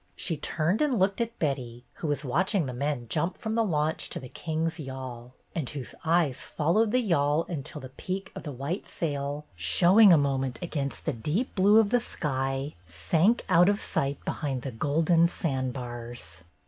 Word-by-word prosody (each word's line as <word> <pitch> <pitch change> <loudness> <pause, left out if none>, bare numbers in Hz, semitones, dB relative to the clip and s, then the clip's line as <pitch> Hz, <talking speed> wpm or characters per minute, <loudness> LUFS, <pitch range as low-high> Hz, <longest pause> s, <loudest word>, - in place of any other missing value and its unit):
She 165 - -1
turned 160 - 0
and 285 -5 +2
looked 195 +3 +2
at 230 0 -3
Betty, 125 -5 -3 0.2
who 160 - -1
was 145 0 -1
watching 180 - +1
the 130 - -4
men 140 -1 -2
jump 160 +9 0
from 220 -2 -3
the 230 0 +2
launch 155 -5 -1
to - - -3
the 130 - -9
Kings' 160 +3 -2
yawl, 130 -3 -7 0.2
and 155 -7 -2
whose 135 -4 -6
eyes 160 -5 +2
followed 190 +8 +1
the 255 - +3
yawl 160 - +2
until 150 -2 -5
the 130 - -8
peak 190 +8 -5
of - - -7
the 150 - -6
white 140 +9 -4
sail, 145 -1 -3
show 170 - +4
ing 210 -4 +10
a 170 - +8
moment 135 -3 0
against 145 -5 -3
the 155 - 0
deep 150 - -2
blue 205 +3 +6
of 215 -2 +2
the 245 -1 +3
sky, 135 - -2
sank 155 - +2
out 180 0 +5
of 205 0 +1
sight 140 0 -1
behind 135 -5 -2
the 135 - -4
golden 160 +7 +3
sandbars. 120 - -4
150 Hz, 185 wpm, -28 LUFS, 130-180 Hz, 0.2 s, ing